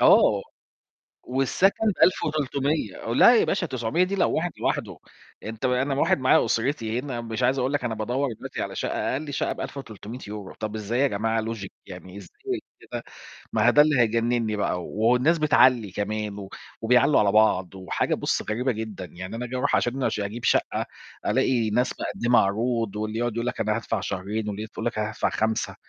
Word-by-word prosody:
آه. - - +5 0.8
والسكن 135 - +1 0.2
ب1300 145 - 0
لأ، 240 - +7
يا - - +4
باشا 190 -3 0
900 130 +4 0
دي 190 +2 -3
لو 195 - +2
واحد 175 +2 0
لوحده، - - -2 0.5
أنت 110 +2 -3
م - - +1
أنا 130 +2 +1
واحد 140 - +2
معايا 130 -1 +4
أسرتي 115 -2 -1
هنا، 130 -3 -5
مش 115 +1 -4
عايز 130 +2 +2
أقول 130 +2 0
لك 145 -3 -1
أنا 115 -2 -1
بادوّر 125 +6 -1
دلوقتي 110 - -6
على - - -5
شَقّة، - - -1
أقَل 145 +2 -4
شَقّة - - 0
ب1300€، 105 -5 -7
طَب 110 0 -5
إزاي 110 +3 -2
يا 140 - +5
جماعة 110 -1 0
logic؟ 110 -3 -4 0.2
يعني 90 0 -10
إزاي 400 - -6 0.2
كده؟ - - -6 0.5
ما - - +3
هو - - +7
ده 150 - +7
اللي 150 -3 +3
هيجنّني 115 -1 +1
بقى. 90 -3 -1
والناس 125 - +2
بتعلّي 130 -8 +4
كمان 105 0 -3
و 95 -1 -8 0.3
وبيعلّوا 125 +5 +4
على 100 -1 +3
بعض، 95 -4 +3
وحاجة 95 -1 -1
بُص - - -1
غريبة 125 +5 0
جدًا. 110 -4 -5
يعني 95 +4 -8
أنا 125 +2 -4
آجي 125 - -6
أروح 140 +3 +1
عشان 130 +2 0
أش - - 0
أجيب 105 +4 -4
شَقّة، - - +1 0.4
ألاقي 120 -4 +2
ناس 125 +4 +1
مقدّمة 120 +1 +2
عروض، 115 +1 0
واللي 110 +1 -3
يقعُد 120 -1 0
يقول 115 +1 -2
لك: 125 - -3
"أنا 110 0 +1
هادفع 115 - -2
شهرين." 105 +3 -3
واللي 105 +2 -5
تقول - - -7
لك: 120 - -2
"أنا 105 0 -1
هادفع 110 - -1
5، 110 0 -1
115 Hz, 185 wpm, -25 LUFS, 105-130 Hz, 0.8 s, لأ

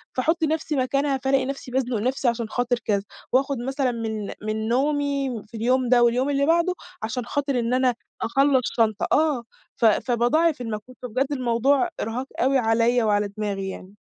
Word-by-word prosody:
فاحُطّ 320 +6 +1
نفسي 315 0 0
مكانها 275 +1 +1
فالاقي 270 -1 +2
نفسي 270 -1 -6
بازنق 255 -2 0
نفسي 255 +4 -1
عشان 235 -2 0
خاطر 245 0 0
كذا، 200 -3 +1 0.3
وآخد 270 +1 +2
مثلًا 265 +1 -1
من 220 -3 -4
من 215 +1 -2
نومي 275 -2 0
في 225 - -9
اليوم 250 +2 +1
ده 245 -1 +5
واليوم 245 +3 +2
اللي 280 0 +2
بعده 340 +3 +3 0.3
علشان 240 +2 -3
خاطر 280 -1 -1
إن 235 +1 -1
أنا 255 -1 +2 0.3
أخلّص 270 +2 +3 0.2
شنطة 220 -3 +2
آه، 295 -5 +2 0.3
ف - - +1
فباضاعف 250 +7 +2
المجهود، 225 +2 -6
فبجد 255 +2 -1
الموضوع 260 +4 +2
إرهاق 235 +4 -3
أوي 270 +2 +3
عليَّ 235 0 +2
وعلى 205 -1 +2
دماغي 200 -2 -2
يعني. 190 0 -9
250 Hz, 165 wpm, -24 LUFS, 230-275 Hz, 0.3 s, ده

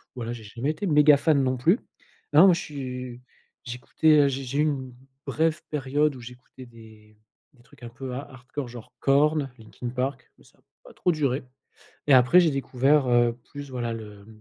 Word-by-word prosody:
voilà 120 -2 -5
j'ai 120 -2 -7
jamais 120 +7 -4
été 200 +6 -5
méga 150 -2 +6
fan 145 -1 +2
non 130 -1 0
plus. 170 - +3 0.5
Non 155 +6 +7
moi 185 - +7
je 170 - -2
suis, 125 -3 -7 0.4
j'écoutais, 135 +5 +2
heu, 140 - +4
j'ai 135 0 -4
j'ai 135 +4 -3
eu - - +5
une 135 -4 -2 0.3
brève 160 +1 0
période 145 +1 0
où 125 - -11
j'écoutais 125 +1 -13
des 110 -2 -17 0.4
des 120 -3 -24
trucs 125 - -20
un 120 - -7
peu 125 +2 -7
ha 135 - -4
hardcore 130 +1 -7
genre 120 0 -12
Korn, 145 +1 +2
Linkin 115 +2 -8
Park, 130 +2 -4
mais - - -23
ça - - -25
a - - -30 0.2
pas - - -14
trop 180 - 0
duré 140 -4 -1 0.6
et 145 - +4
après 130 +7 +6
j'ai 170 -3 +3
découvert, 135 +1 +1
heu, 120 0 +2
plus 145 -1 -9
voilà 120 -2 -3
le 105 -2 -10
130 Hz, 195 wpm, -25 LUFS, 120-145 Hz, 0.6 s, Non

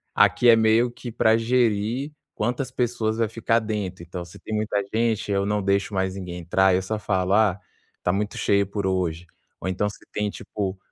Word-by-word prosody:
aqui 120 - +5
é 115 - +9
meio 110 +2 +4
que 120 0 -8
pra 110 -1 +3
gerir 115 +2 +1 0.2
quantas 125 +4 -2
pessoas 115 -2 -1
vai 115 - +2
ficar 115 +1 +1
dentro. 105 -5 -4
Então, 90 +1 -6
se 85 - -14
tem 110 - -5
muita 105 -1 0
gente, 110 -2 0
eu 100 0 +1
não 105 0 0
deixo 100 +1 +1
mais 95 -1 -1
ninguém 90 -2 -6
entrar, 95 +2 +3
eu 95 - +1
só 105 +3 -3
falo: 95 -2 0
"Ah, 105 -3 +3 0.4
tá 90 - +2
muito 105 +1 -2
cheio 100 -1 +2
por 100 0 -3
hoje". 90 -3 -1 0.4
Ou - - -3
então, 95 +3 0
se 100 - -12
tem 105 0 -1
tipo, 100 -1 -4
105 Hz, 200 wpm, -24 LUFS, 95-110 Hz, 0.4 s, é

